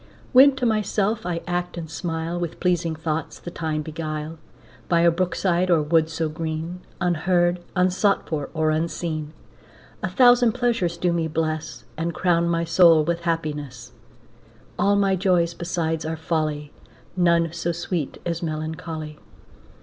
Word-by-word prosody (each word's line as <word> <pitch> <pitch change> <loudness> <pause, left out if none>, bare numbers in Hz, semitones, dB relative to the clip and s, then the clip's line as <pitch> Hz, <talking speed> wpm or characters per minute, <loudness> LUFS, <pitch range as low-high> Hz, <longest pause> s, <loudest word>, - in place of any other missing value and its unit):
When 270 +2 +8
to 260 -2 -2
myself 215 -2 0
I 170 -1 -2
act 175 0 -3
and 165 -2 -5
smile, 165 +1 -3
With 170 -2 -4
pleasing 170 -3 0
thoughts 160 0 -3
the 175 - -8
time 155 -2 -2
beguile, 155 0 -5 0.5
By 170 -2 +4
a 170 0 +5
brook 175 0 -1
side 180 -1 +1
or 165 -3 +4
wood 160 +1 +2
so 165 0 -2
green, 160 +2 -4 0.2
Unheard, 175 0 +1 0.2
unsought 185 +2 +2
for, 145 -4 -3
or 155 0 +2
unseen, 155 -1 -2 0.7
A - - -1
thousand 245 -3 +5
pleasures 230 -9 0
do 175 0 +1
me 165 -1 0
bless, 155 0 -3
And 165 0 -2
crown 170 -2 +2
my 170 0 +1
soul 165 -1 +5
with 170 +2 -1
happiness. 145 -7 -4 0.9
All 200 0 +3
my 195 -1 +3
joys 180 -3 +2
besides 165 -2 -2
are 160 +1 -3
folly, 155 -2 -2 0.4
None 170 -2 +2
so 170 0 -2
sweet 170 -3 -3
as 170 -1 -2
melancholy. 155 -1 -5
170 Hz, 150 wpm, -23 LUFS, 160-180 Hz, 0.9 s, When